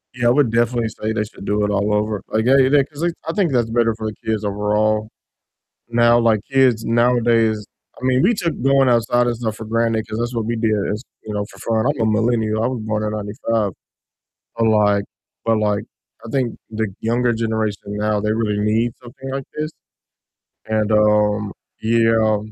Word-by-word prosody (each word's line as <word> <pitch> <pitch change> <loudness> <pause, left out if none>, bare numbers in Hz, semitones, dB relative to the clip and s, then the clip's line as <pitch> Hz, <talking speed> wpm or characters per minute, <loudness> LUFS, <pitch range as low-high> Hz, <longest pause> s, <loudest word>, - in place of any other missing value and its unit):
yeah, 120 -1 +1
I - - +5
would 130 -4 +3
definitely 120 -1 +1
say 110 +1 -4
they 110 -1 0
should 100 -1 -11
do 105 0 0
it 105 - +1
all 100 +1 0
over, 105 -1 0
like, 110 +1 0
yeah 135 +2 +5
yeah, 135 +1 +4
'cause 145 +2 -11
they 175 - +1 0.2
I 165 - -1
think 190 -8 +1
that's 120 -3 +1
better 115 -1 +2
for 110 -1 -5
the 105 - -4
kids 110 -1 -1
overall. 105 +1 0 0.8
Now, 120 0 +4
like, 115 -2 +3
kids 125 -5 +3
nowadays, 115 -2 +2 0.4
I - - -3
mean 130 0 +3
we 230 +5 +4
took 170 -5 -1
going 135 0 +4
outside 120 +1 +2
and 120 - 0
stuff 110 -3 -3
for 110 - -8
granted 115 0 0
'cause 110 - -5
that's 120 +1 -2
what 115 -2 -1
we 115 +1 -1
did 110 -1 +1 0.2
as 105 +4 -4 0.2
you 105 - -6
know, 105 0 -2
for - - -16
fun, 110 0 0
I'm 145 -5 -1
a - - +3
millennial, 110 0 +1
I - - +2
was 125 -3 -3
born 110 0 -2
in 105 - -1
'95. 105 0 -2 0.9
But 115 -1 +2
like 105 -2 +3 0.4
but 115 -1 +2
like 105 -1 0 0.4
I - - -8
think 130 -4 -1
the 110 -1 -2
younger 120 +1 +1
generation 110 -2 -2
now 105 0 0
they 105 +1 0
really 105 -2 -1
need 110 +3 +1
something 130 +2 -9
like 135 0 -4
this, 155 +1 -2 1.0
and, 110 0 0
um, 105 -1 +2 0.3
yeah, 115 -1 +3
110 Hz, 200 wpm, -20 LUFS, 105-120 Hz, 1.0 s, I